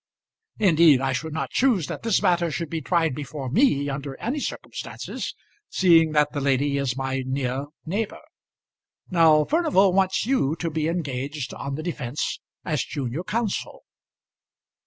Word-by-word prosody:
Indeed 165 Hz, -8 st, +5 dB
I 135 Hz, 0 st, 0 dB
should 160 Hz, +5 st, -3 dB
not 160 Hz, -, -3 dB
choose 240 Hz, -, +2 dB
that -, -, -6 dB
this 225 Hz, -4 st, +1 dB
matter 175 Hz, -1 st, +3 dB
should 155 Hz, +2 st, -4 dB
be 165 Hz, -1 st, -2 dB
tried 165 Hz, 0 st, +1 dB
before 135 Hz, -1 st, -5 dB
me 145 Hz, -, +3 dB
under 140 Hz, -1 st, -5 dB
any 255 Hz, +7 st, -2 dB
circumstances, -, -, -5 dB, 0.3 s
seeing 165 Hz, -4 st, +4 dB
that 150 Hz, -1 st, +3 dB
the 145 Hz, -, -2 dB
lady 140 Hz, +1 st, +1 dB
is 135 Hz, -2 st, -1 dB
my 135 Hz, 0 st, -2 dB
near 130 Hz, +1 st, -2 dB, 0.2 s
neighbour. 200 Hz, -, -3 dB, 0.9 s
Now 160 Hz, -3 st, +5 dB
Furnival 295 Hz, -, +3 dB
wants 190 Hz, +1 st, +2 dB
you 220 Hz, -, +1 dB
to 165 Hz, 0 st, -3 dB
be 155 Hz, 0 st, -1 dB
engaged 145 Hz, -4 st, -3 dB
on 140 Hz, 0 st, -5 dB
the 155 Hz, -, -5 dB
defence 150 Hz, -6 st, -3 dB, 0.3 s
as 155 Hz, -4 st, 0 dB
junior 140 Hz, +3 st, -4 dB
counsel." 220 Hz, +1 st, -3 dB
155 Hz, 150 wpm, -24 LUFS, 140-180 Hz, 0.9 s, Indeed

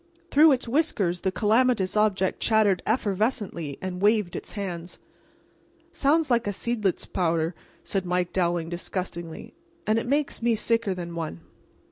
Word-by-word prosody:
Through 305 Hz, +2 st, +7 dB
its 250 Hz, -2 st, -2 dB
whiskers 225 Hz, -, +1 dB
the 190 Hz, -, 0 dB
calamitous 220 Hz, -1 st, +2 dB
object 205 Hz, -3 st, +1 dB
chattered 215 Hz, -4 st, +3 dB
effervescently 205 Hz, -, -1 dB
and 185 Hz, -1 st, -4 dB
waved 210 Hz, -3 st, +2 dB
its -, -, -6 dB
hands. 180 Hz, -4 st, -5 dB, 0.9 s
"Sounds 315 Hz, -2 st, +2 dB
like 235 Hz, -2 st, +2 dB
a -, -, +1 dB
seidlitz 210 Hz, -2 st, -1 dB
powder," 165 Hz, -1 st, 0 dB, 0.3 s
said 195 Hz, -2 st, -2 dB
Mike 180 Hz, 0 st, -1 dB
Dowling, 175 Hz, -2 st, 0 dB
disgustedly, 175 Hz, -1 st, -5 dB, 0.3 s
"and 215 Hz, +1 st, +2 dB
it 230 Hz, -, -5 dB
makes 285 Hz, 0 st, 0 dB
me 235 Hz, -1 st, +2 dB
sicker 230 Hz, -2 st, 0 dB
than 170 Hz, -1 st, -6 dB
one. 160 Hz, -, -5 dB
200 Hz, 140 wpm, -26 LUFS, 175-230 Hz, 0.9 s, Through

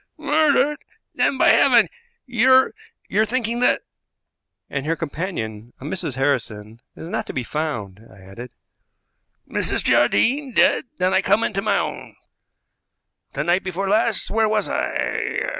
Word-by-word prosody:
"Murdered! 300 Hz, -1 st, +2 dB, 0.3 s
Then 270 Hz, -, +1 dB
by -, -, +4 dB
heaven! -, -, +5 dB, 0.4 s
you're 260 Hz, +2 st, +4 dB, 0.3 s
you're 215 Hz, -, +2 dB
thinking 240 Hz, -1 st, -2 dB
that 250 Hz, -, +2 dB, 0.4 s
" -, -, -61 dB
"And 140 Hz, +1 st, -4 dB
her 165 Hz, -, +1 dB
companion, 130 Hz, -, -5 dB
a -, -, -12 dB
Mrs. 150 Hz, -4 st, -4 dB
Harrison, 115 Hz, -5 st, -2 dB, 0.2 s
is 160 Hz, -, -9 dB
not -, -, -3 dB
to -, -, -6 dB
be 130 Hz, -, -2 dB
found," 115 Hz, -9 st, -5 dB
I 95 Hz, -, -17 dB
added. 100 Hz, +6 st, -11 dB, 0.9 s
"Mrs. -, -, 0 dB
Jardine 265 Hz, -, +2 dB
dead! 280 Hz, +4 st, +3 dB
Then 185 Hz, +1 st, +1 dB
I 190 Hz, -, +3 dB
come 205 Hz, +4 st, +2 dB
into 195 Hz, -3 st, -1 dB
my 200 Hz, -1 st, +1 dB
own. -, -, -5 dB, 1.2 s
The 145 Hz, -, -2 dB
night 175 Hz, +3 st, +1 dB
before 190 Hz, +1 st, -3 dB
last 215 Hz, +1 st, +1 dB
where 220 Hz, 0 st, +2 dB
was 215 Hz, -1 st, 0 dB
I? -, -, -2 dB
185 Hz, 145 wpm, -21 LUFS, -, 1.2 s, heaven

